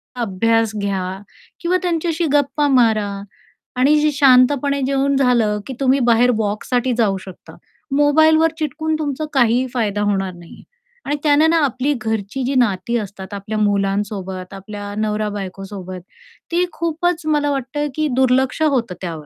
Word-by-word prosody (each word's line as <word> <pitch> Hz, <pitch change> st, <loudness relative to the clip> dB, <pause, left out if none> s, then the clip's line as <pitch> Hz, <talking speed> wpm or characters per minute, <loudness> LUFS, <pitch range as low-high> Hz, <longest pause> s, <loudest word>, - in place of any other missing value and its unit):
अभ्यास 225 Hz, 0 st, +1 dB
घ्या. 190 Hz, -1 st, -3 dB, 0.4 s
किंवा 355 Hz, +2 st, +1 dB
त्यांच्याशी 335 Hz, -1 st, -1 dB
गप्पा 290 Hz, +1 st, +2 dB
मारा 225 Hz, -6 st, +3 dB, 0.7 s
आणि 275 Hz, +4 st, +4 dB
जी 305 Hz, 0 st, +2 dB
शांतपणे 280 Hz, 0 st, +4 dB
जेवून 275 Hz, +1 st, +1 dB
झालं, 235 Hz, -6 st, +2 dB
की 265 Hz, -, -5 dB
तुम्ही 270 Hz, 0 st, +3 dB
बाहेर 240 Hz, 0 st, +4 dB
वॉकसाठी 230 Hz, +4 st, -1 dB
जाऊ 200 Hz, -4 st, +2 dB
शकता. 190 Hz, -, -12 dB, 0.4 s
मोबाईलवर 315 Hz, +2 st, +4 dB
चिटकून 315 Hz, +1 st, -2 dB
तुमचा 300 Hz, 0 st, -2 dB
काहीही 250 Hz, 0 st, +3 dB
फायदा 205 Hz, -4 st, -1 dB
होणार 195 Hz, -3 st, -1 dB
नाही 175 Hz, -1 st, -14 dB
आहे. -, -, -15 dB, 0.4 s
आणि 290 Hz, -, -1 dB
त्यानं 300 Hz, +2 st, +4 dB
ना 335 Hz, -, +3 dB
आपली 265 Hz, +3 st, -1 dB
घरची 220 Hz, +3 st, -3 dB
जी 265 Hz, +2 st, -1 dB
नाती 235 Hz, 0 st, +1 dB
असतात 195 Hz, -1 st, -8 dB
आपल्या 205 Hz, +2 st, -5 dB
मुलांसोबत, 195 Hz, -2 st, -1 dB
आपल्या 205 Hz, +1 st, -8 dB
नवरा-बायकोसोबत, 195 Hz, -3 st, -4 dB, 0.5 s
ती 355 Hz, +1 st, +2 dB
खूपच 335 Hz, 0 st, -1 dB
मला 295 Hz, -1 st, +1 dB
वाटतं, 280 Hz, +2 st, -2 dB
की 310 Hz, -1 st, 0 dB
दुर्लक्ष 260 Hz, +2 st, +2 dB
होतं 245 Hz, -, +1 dB
त्यावर. 165 Hz, -4 st, -6 dB
245 Hz, 140 wpm, -19 LUFS, 205-290 Hz, 0.7 s, आणि